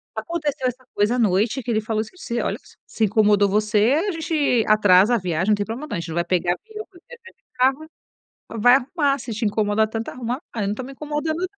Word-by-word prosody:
Aconteceu 300 -6 -2
essa 255 +1 -6
coisa 210 +4 +1
à - - -1
noite 215 +4 +1
que 245 - -3
ele 215 -1 +1
falou 215 0 -1
assim: 220 +10 -9
"Se, 235 -9 -3
olha, - - -1
s - - -17
se 220 - 0
incomodou 205 -1 +3
você, 210 +3 +2
a - - 0
gente 310 -8 0
atrasa 210 +1 +5
a - - +3
viagem, 180 -1 -1
não 210 - +5
tem 205 0 -3
problema 240 +8 -6
não. - - -3
A - - -3
gente 170 0 -6
não 160 - -5
vai 170 0 0
pegar 175 -1 +1
avião, 430 - -9
vai 355 - -17
viajar 470 -1 -14
de - - -45
carro, 265 +4 +1 0.7
vai 245 +3 +7
arrumar 280 +1 0
se 240 -2 -7
te 220 +2 -3
incomoda 210 0 +1
tanto 225 +1 -5
arrumar. 245 0 -4
'Ah, 225 - -4
eu - - 0
não 200 - -1
estou 230 +5 -5
me 270 - -9
incomodando 300 +3 -3
não'." 370 +3 -5
230 Hz, 250 wpm, -22 LUFS, 210-285 Hz, 0.7 s, vai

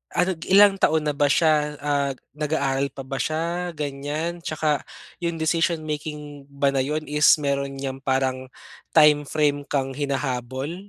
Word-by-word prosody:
ano 180 +1 +1
ilang 200 +1 +7
taon 155 -3 +2
na 150 - +1
ba 145 0 +3
siya, 150 -2 +2
ah, 140 -1 0 0.3
nag-aaral 140 -3 0
pa 135 - -7
ba 135 - -4
siya 170 +3 -2
ganyan 150 +4 -4
'tsaka 155 -2 -1 0.4
yung 170 -1 -1
decision 165 +1 +1
making 150 -1 -6
ba 140 0 +1
na 135 - +3
yun 155 +3 -3
is 150 +1 +2 0.2
mayro'n 140 -1 -1
niyang 135 -1 -5
parang 130 -1 -1 0.4
time 150 -2 +6
frame 145 -2 +1
kang 135 -2 -1
hinahabol? 135 +1 -3
145 Hz, 150 wpm, -23 LUFS, 140-155 Hz, 0.4 s, ilang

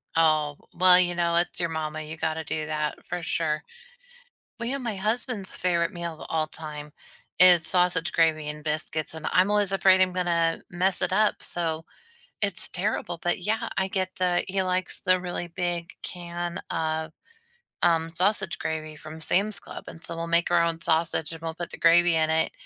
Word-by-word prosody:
Oh, 155 -2 +3 0.2
well, 180 0 +7
you 175 -1 +2
know, 170 -1 +1
it's 175 +1 +1
your 170 -1 +1
mama, 155 -1 -3
you 155 +1 -7
gotta 160 0 -2
do 155 0 -3
that 150 -1 -2
for 175 - -3
sure. 155 -2 -1 1.0
Well, 235 - -2
you - - -1
know, - - -3
my 235 -5 -3
husband's 215 0 -2
favorite 170 -2 0
meal 170 -1 -4
of - - -7
all 155 -1 0
time 150 -1 -8 0.5
is 175 -3 +7
sausage 180 -2 +2
gravy 160 -2 +2
and 150 0 -6
biscuits, 155 0 -3
and 160 -1 -5
I'm 185 +3 +4
always 205 -2 +2
afraid 190 -1 +5
I'm 185 -1 +3
gonna 170 -2 +1
mess 185 +1 0
it - - +2
up. 210 +2 +3
So, 165 -2 -3 0.6
it's 200 -5 0
terrible. 180 -2 -2
But, 175 +1 0
yeah, 220 +5 -1
I 190 0 +1
get 185 -1 -2
the 180 -1 +1
he 190 0 0
likes 185 0 -2
the 185 0 +3
really 175 -1 -4
big 175 -1 -2
can 175 0 -4
of, 160 -1 -2 0.7
um, 165 -1 +3
sausage 190 +2 0
gravy 155 -1 -3
from 155 +1 -10
Sam's 200 +6 +1
Club. - - -10
And 165 - -11
so, 170 - -5
we'll 165 0 -4
make 170 +1 +2
our 170 - +5
own 165 -1 -1
sausage, 165 -1 0
and 165 0 -9
we'll 165 -1 -3
put 170 +1 -6
the - - -9
gravy 175 +1 +5
in 160 -1 +2
it. 160 0 +2
170 Hz, 190 wpm, -26 LUFS, 160-185 Hz, 1.0 s, well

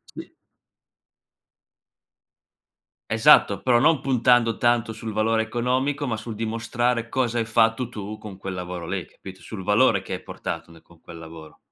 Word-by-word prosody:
Sì. - - -10 2.8
Esatto, 110 -4 +5
però 120 -2 +3
non 155 +1 +4
puntando 120 -3 +2
tanto 120 -2 +1
sul 110 0 -6
valore 110 +1 +1
economico, 130 +5 -1
ma 115 - -1
sul 110 0 -7
dimostrare 115 +1 -1
cosa 120 -2 -1
hai 115 - 0
fatto 115 +1 +2
tu 105 -2 -7
con 105 -3 -10
quel 95 -1 -6
lavoro 90 -2 -6
lì, 95 -2 -3
capito, 95 -1 -13
sul 105 -4 -8
valore 105 +1 +3
che - - -7
hai - - -5
portato 80 0 -6
nel 80 - -16
con 85 -1 -22
quel 85 -1 -11
lavoro. 80 -2 -12
110 Hz, 155 wpm, -24 LUFS, 95-120 Hz, 2.8 s, Esatto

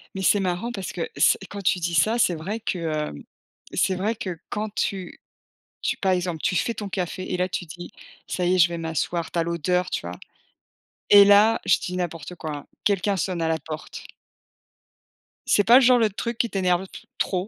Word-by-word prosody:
Mais 190 - -3
c'est 205 +2 +4
marrant 185 +6 -2
parce 195 -4 -5
que 470 - -4
c - - +4
quand 205 - -6
tu 185 -1 +1
dis 170 0 -2
ça, 220 +10 +3
c'est 180 -7 +2
vrai 195 +8 -4
que, 190 -4 -3
hem, 155 - -3 0.5
c'est 190 - +1
vrai 210 +5 -1
que 185 -5 -5
quand 215 +1 -3
tu 195 -3 -3 0.6
tu - - 0
par 190 - 0
exemple, 180 -3 -2
tu 185 - +1
fais 235 - 0
ton 205 - -5
café 185 -1 -4
et - - +1
là 180 0 +1
tu 180 - -3
dis: 175 +2 -10 0.4
«Ça 180 - -2
y 180 +1 +3
est, - - 0
je 170 -1 +6
vais 170 - -4
m'asseoir», 165 +1 -2
tu - - -3
as 170 - +3
l'odeur, 170 +2 0
tu - - -2
vois? 90 +1 -7 0.9
Et 200 -1 +9
là, 210 +3 +6
je - - +4
dis 180 - -5
n'importe 175 -1 -4
quoi 155 -3 -5
hein, 145 - -12 0.2
quelqu'un 200 -1 +1
sonne 175 +1 -2
à 165 - +1
la 160 0 +1
porte. 155 +1 -8 1.4
C'est 205 - +4
pas, 240 +5 +7
genre, 250 -1 +5
le 220 - +3
truc 230 +3 -4
qui 235 - 0
t'énerve 185 -3 +1
le 190 - -8
p - - -11 0.2
trop? 185 0 -1
185 Hz, 215 wpm, -24 LUFS, 170-205 Hz, 1.4 s, Et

